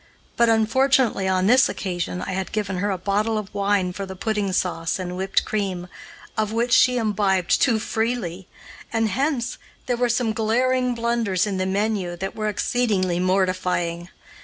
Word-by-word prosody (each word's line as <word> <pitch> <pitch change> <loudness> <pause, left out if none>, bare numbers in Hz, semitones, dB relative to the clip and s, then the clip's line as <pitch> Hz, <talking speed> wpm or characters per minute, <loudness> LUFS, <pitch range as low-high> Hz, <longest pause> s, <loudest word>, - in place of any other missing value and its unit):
But, 235 -1 +4
unfortunately, 230 -1 +2
on 185 0 +1
this 250 +5 +5
occasion 180 -1 -3
I - - -4
had 190 0 -3
given 200 -4 -2
her 205 +2 0
a 190 - -1
bottle 205 +4 0
of 210 -2 -5
wine 200 -2 +1
for 195 +1 -5
the 190 - -7
pudding 205 0 -1
sauce 170 -3 -1
and 180 -1 -5
whipped 190 +1 0
cream, 190 -4 -3 0.5
of 215 -1 -1
which 235 +2 0
she 250 +1 +5
imbibed 200 -5 +1
too 240 -5 +4
freely, 220 -5 -2 0.4
and 225 -1 +1
hence 255 +2 -1 0.3
there 245 -1 -1
were 245 0 +1
some 235 -1 +1
glaring 250 +3 +1
blunders 230 -5 0
in 200 -2 -2
the 185 0 -1
menu 195 -2 -1
that 195 +2 -5
were 215 -1 -1
exceedingly 200 -5 0
mortifying. 180 -2 0
205 Hz, 165 wpm, -23 LUFS, 185-230 Hz, 0.5 s, this